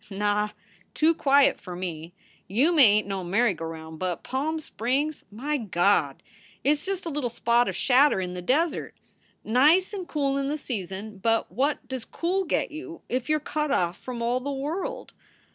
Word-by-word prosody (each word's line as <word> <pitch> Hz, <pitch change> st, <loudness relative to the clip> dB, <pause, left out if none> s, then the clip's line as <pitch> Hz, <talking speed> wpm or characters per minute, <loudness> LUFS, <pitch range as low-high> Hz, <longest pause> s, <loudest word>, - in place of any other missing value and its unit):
"Nah! 205 Hz, +1 st, 0 dB, 0.5 s
Too 320 Hz, +2 st, +4 dB
quiet 280 Hz, -3 st, +4 dB
for 180 Hz, -3 st, -8 dB
me. 175 Hz, -1 st, -6 dB, 0.3 s
Yuma 290 Hz, -, +3 dB
ain 210 Hz, -3 st, +6 dB
t -, -, -14 dB
no 195 Hz, -2 st, -3 dB
merry 200 Hz, +5 st, +2 dB
go 165 Hz, -1 st, -6 dB
round, 160 Hz, -1 st, -8 dB
but 180 Hz, -2 st, -3 dB
Palm 305 Hz, +5 st, -2 dB
Springs 285 Hz, +2 st, -2 dB
my 285 Hz, +8 st, -2 dB
Gawd! 180 Hz, -, +1 dB, 0.4 s
It 280 Hz, -, +4 dB
s 295 Hz, -1 st, -1 dB
just 390 Hz, -2 st, -2 dB
a -, -, -2 dB
little 280 Hz, -4 st, -1 dB
spot 235 Hz, +1 st, +2 dB
of -, -, -2 dB
shadder 270 Hz, -3 st, +4 dB
in 180 Hz, -1 st, -3 dB
the 180 Hz, -, -5 dB
desert. 295 Hz, -, 0 dB, 0.5 s
Nice 300 Hz, -, +4 dB
and 375 Hz, -3 st, -5 dB
cool 275 Hz, -2 st, 0 dB
in 275 Hz, -, -1 dB
the 295 Hz, +2 st, -1 dB
season, 205 Hz, -, -6 dB
but 225 Hz, 0 st, +1 dB
what 265 Hz, +5 st, -1 dB
does 260 Hz, -2 st, -4 dB
cool 370 Hz, +3 st, -1 dB
get -, -, 0 dB
you 335 Hz, +2 st, -8 dB
if 255 Hz, +1 st, -2 dB
you 310 Hz, -, +4 dB
re 300 Hz, -, -10 dB
cut 300 Hz, 0 st, -1 dB
off 175 Hz, -8 st, +1 dB
from 245 Hz, -2 st, -6 dB
all 240 Hz, +2 st, +1 dB
the 270 Hz, +3 st, -5 dB
world? 345 Hz, -, -4 dB
255 Hz, 190 wpm, -26 LUFS, 200-300 Hz, 0.5 s, ain